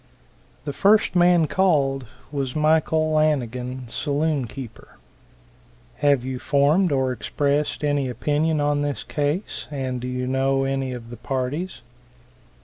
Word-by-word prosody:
The 145 - -3
first 205 +4 +3
man 175 -2 +5
called 140 -8 +1 0.2
was 135 -3 -3
Michael 155 0 +2
Lanigan, 130 -4 0
saloon 145 +2 -1
keeper. 125 0 -10 1.0
"Have 140 -4 +2
you 130 -1 -4
formed 150 +7 +3
or 130 -2 +1
expressed 145 +5 -1
any 145 -3 +1
opinion 150 +5 0
on 145 0 +1
this 145 -1 -2
case, 150 +7 -2
and 130 -4 -3
do 125 - -4
you 125 0 -2
know 135 +1 +1
any 135 -1 -1
of 120 -2 -8
the 120 - -8
parties?" 135 +8 -3
140 Hz, 130 wpm, -23 LUFS, 130-155 Hz, 1.0 s, man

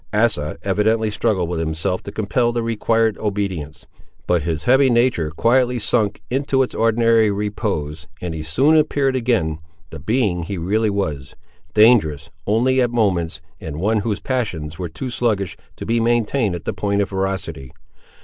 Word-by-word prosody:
Asa 105 -10 +1
evidently 105 +3 +1
struggled 105 -5 0
with 85 -1 -3
himself 80 +3 -2
to 100 - -8
compel 115 +4 0
the 120 -1 -2
required 115 -1 +1
obedience, 95 -9 -3 0.4
but 90 -2 +2
his 80 0 -2
heavy 130 +2 +4
nature 120 -9 +2
quietly 125 - +2
sunk 105 -2 0
into 135 0 +1
its 125 - -5
ordinary 115 -1 +3
repose, 100 -8 -3
and 85 0 -4
he 80 - -5
soon 130 - +3
appeared 145 -3 +2
again 110 -11 0 0.3
the 80 - -8
being 105 - 0
he 95 +4 -4
really 105 +6 +1
was; 75 -10 -3 0.4
dangerous, 105 - +4 0.2
only, 125 +5 +2
at 120 - +2
moments, 90 -9 0 0.2
and 80 -1 -6
one 110 +4 +1
whose 105 0 -2
passions 90 - -3
were 90 -2 -3
too 120 +11 -6
sluggish 105 -7 -1 0.2
to - - -7
be 115 +1 +1
long 115 - +1
maintained 115 -3 +1
at 85 - -8
the - - -2
point 100 0 -1
of 100 - 0
ferocity. 95 -9 -3
105 Hz, 165 wpm, -20 LUFS, 85-120 Hz, 0.4 s, heavy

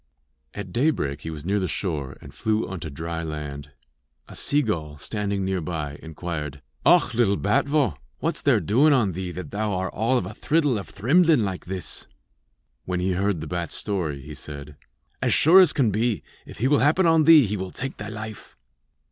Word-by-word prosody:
At 95 -3 -6
daybreak 75 - 0
he 80 - -6
was 80 -1 -7
near 100 +3 +1
the 95 - -1
shore 75 -5 -3
and - - -12
flew 110 0 0
unto 90 -4 -6
dry 80 +3 -4
land. 75 -3 -6 0.6
A - - -12
seagull, 95 - 0
standing 100 +4 -2
near 95 -1 -1
by, 75 -3 -4
inquired: 80 -3 -6 0.2
'Och, - - +5
lil 115 -4 +3
bat 100 +7 +1
vogh, 140 - +1 0.2
what's - - -2
there - - +4
doin 140 +9 +4
on 115 -8 +2
thee 90 +1 -4
that 90 -3 -7
thou 105 0 -1
are 95 -1 -2
all 115 +4 +1
of 95 - -1
a 100 - -7
thriddle 145 -3 +1
of 100 - -9
thrimblin 150 - +4
like 95 -2 -4
this?' 95 0 -6 0.8
When 90 -1 -2
he 95 +1 0
heard 95 -2 0
the - - -5
bat's 85 -2 -3
story, 85 -9 -2
he 75 +3 -9
said: 70 0 -9 0.5
'As - - +2
sure 170 +5 +7
as 180 -5 +7
can 120 -7 +2
be, 110 +1 0 0.2
if - - -11
he 120 - +1
will 145 +1 +4
happen 155 +6 +3
on 165 -2 +4
thee, 160 -4 +8
he 105 +1 -2
will 95 -2 -4
take 135 +7 -5
thy - - -6
life.' 110 -1 -8
95 Hz, 195 wpm, -24 LUFS, 80-120 Hz, 0.8 s, thee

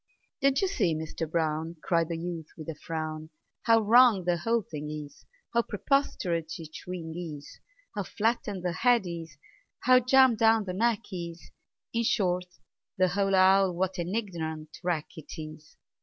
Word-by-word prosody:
"Don't 275 0 +3
you - - +3
see, 180 - +1
Mister 160 +1 -4
Brown," 160 0 -1
Cried 165 -2 +1
the 165 - -2
youth, 165 -2 -5
with 155 - -9
a 165 - -3
frown, 155 0 -5 0.4
"How 230 -1 +5
wrong 225 -2 +6
the 175 0 +1
whole 230 +6 0
thing 150 -3 -6
is, 150 -2 -8 0.3
How 235 - +4
preposterous 180 - -1
each 155 -1 -9
wing 170 -3 -5
is, 155 -5 -7 0.4
How 205 - -1
flattened 205 -2 -1
the 180 - 0
head 235 +5 +3
is, 165 -5 -7 0.4
how 255 +1 +6
jammed 255 -2 +5
down 225 -1 +5
the 185 -2 -4
neck 230 +3 +1
is 170 -2 -7 0.4
In 230 - +1
short, 180 -5 +1 0.5
the 185 -1 +3
whole 195 +1 +1
owl, 190 -1 +5
what 185 +1 -1
an 175 +4 -2
ignorant 160 -7 -4
wreck 170 -4 0
't 160 +2 -9
is! 155 0 -19
180 Hz, 165 wpm, -28 LUFS, 160-220 Hz, 0.5 s, wrong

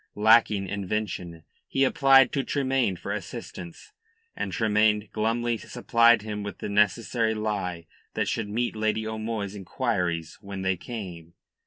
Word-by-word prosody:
Lacking 105 -2 +4
invention, 95 -4 -4 0.2
he 135 - +1
applied 135 0 +5
to 140 - 0
Tremayne 130 -8 0
for 85 - -6
assistance, 85 -2 -7 0.4
and - - -3
Tremayne 105 -1 +2
glumly 115 +2 0
supplied 115 -2 +3
him 105 -1 -4
with 100 0 -6
the - - -5
necessary 110 +2 +2
lie 100 -6 -3 0.3
that - - 0
should 110 -3 -2
meet 120 +3 -1
Lady 110 0 0
O'Moy's 110 -2 -3
inquiries 90 -5 -2
when 100 -1 -6
they 95 0 +1
came. 90 -5 -8
105 Hz, 135 wpm, -26 LUFS, 95-115 Hz, 0.4 s, applied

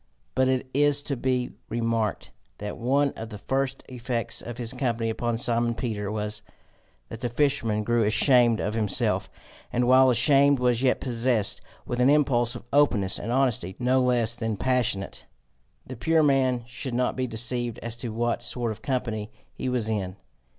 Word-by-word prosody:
But 130 0 +2
it 130 0 0
is 145 +1 +3
to 140 - -2
be 125 0 -1 0.2
remarked 115 -2 -1 0.3
that 105 0 -5
one 140 +4 +1
of 110 0 -8
the 105 - -8
first 135 +4 -2
effects 120 -2 -3
of 120 -1 -7
his 120 -2 -3
company 115 -4 -1
upon 120 +1 -2
Simon 120 0 0
Peter 105 -5 -3
was, 105 0 -4 0.7
that 115 - -7
the 120 - -2
fisherman 120 -5 +1
grew 120 +2 +1
ashamed 120 +1 +4
of 105 - -2
himself, 105 -4 +1 0.4
and 120 0 +1
while 130 +1 +6
ashamed 140 +3 +4
was 125 -1 +1
yet 130 -1 +2
possessed 120 -4 0 0.2
with 120 - -3
an 125 +2 +5
impulse 130 -5 +2
of - - -9
openness 115 -10 +2
and 115 - -4
honesty 120 -8 0
no 130 +1 +2
less 120 -2 +2
than 115 -3 -3
passionate. 120 -5 -1 0.6
The 130 - -8
pure 160 +6 +2
man 130 -4 +2
should 125 +1 -5
not 125 0 0
be 130 0 -1
deceived 120 0 -2
as 115 0 -4
to 120 -1 -5
what 120 +2 -1
sort 120 -2 -2
of 110 0 -8
company 115 -5 -3 0.2
he 130 - -4
was 125 -3 -1
in! 100 -4 -2
120 Hz, 170 wpm, -26 LUFS, 115-130 Hz, 0.7 s, while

